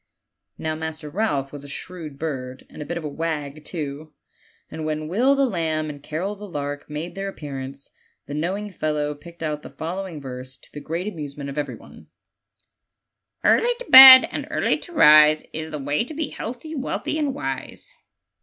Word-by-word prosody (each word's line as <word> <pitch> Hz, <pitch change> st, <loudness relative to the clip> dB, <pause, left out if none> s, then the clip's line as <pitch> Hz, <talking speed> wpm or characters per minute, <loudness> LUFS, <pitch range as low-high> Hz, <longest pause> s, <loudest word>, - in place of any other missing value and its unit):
Now, 160 Hz, 0 st, -2 dB
Master 155 Hz, -1 st, -6 dB
Ralph 145 Hz, -8 st, -1 dB
was 145 Hz, -1 st, -8 dB
a -, -, -10 dB
shrewd 155 Hz, -2 st, -7 dB
bird, 130 Hz, -4 st, -5 dB
and -, -, -10 dB
a -, -, -5 dB
bit 170 Hz, -, -4 dB
of 170 Hz, -, -6 dB
a -, -, -3 dB
wag 150 Hz, -1 st, -4 dB
too; 155 Hz, -2 st, -6 dB, 0.6 s
and 160 Hz, -, -6 dB
when 155 Hz, 0 st, -3 dB
Will 245 Hz, -, +3 dB
the 275 Hz, 0 st, +3 dB
lamb 160 Hz, -8 st, -1 dB
and 145 Hz, -1 st, -12 dB
Carol 165 Hz, +8 st, -3 dB
the 205 Hz, 0 st, -10 dB
lark 145 Hz, -2 st, -5 dB
made 155 Hz, +4 st, -5 dB
their 195 Hz, 0 st, -4 dB
appearance, 140 Hz, -5 st, -7 dB, 0.3 s
the 145 Hz, -, -7 dB
knowing 190 Hz, +7 st, -3 dB
fellow 150 Hz, -3 st, -2 dB
picked 165 Hz, +3 st, -12 dB
out 150 Hz, -1 st, -2 dB
the -, -, -10 dB
following 175 Hz, 0 st, -5 dB
verse, 130 Hz, -1 st, -8 dB
to -, -, -19 dB
the 150 Hz, -, -6 dB
great 165 Hz, +6 st, -4 dB
amusement 145 Hz, -6 st, -6 dB
of 140 Hz, -, -10 dB
everybody: 145 Hz, -, -8 dB, 0.7 s
" -, -, -54 dB
Early 485 Hz, +1 st, +4 dB
to -, -, -8 dB
bed, 260 Hz, 0 st, +12 dB
and -, -, -4 dB
early -, -, 0 dB
to -, -, -13 dB
rise, 155 Hz, -, +7 dB
Is 160 Hz, 0 st, -5 dB
the 155 Hz, -, -5 dB
way 145 Hz, +4 st, -1 dB
to 310 Hz, -, -8 dB
be 310 Hz, -1 st, -2 dB
healthy, 250 Hz, +8 st, -7 dB
wealthy, 305 Hz, +2 st, -3 dB
and 285 Hz, -3 st, -1 dB
wise." 135 Hz, -1 st, -6 dB
155 Hz, 185 wpm, -23 LUFS, 145-190 Hz, 0.7 s, bed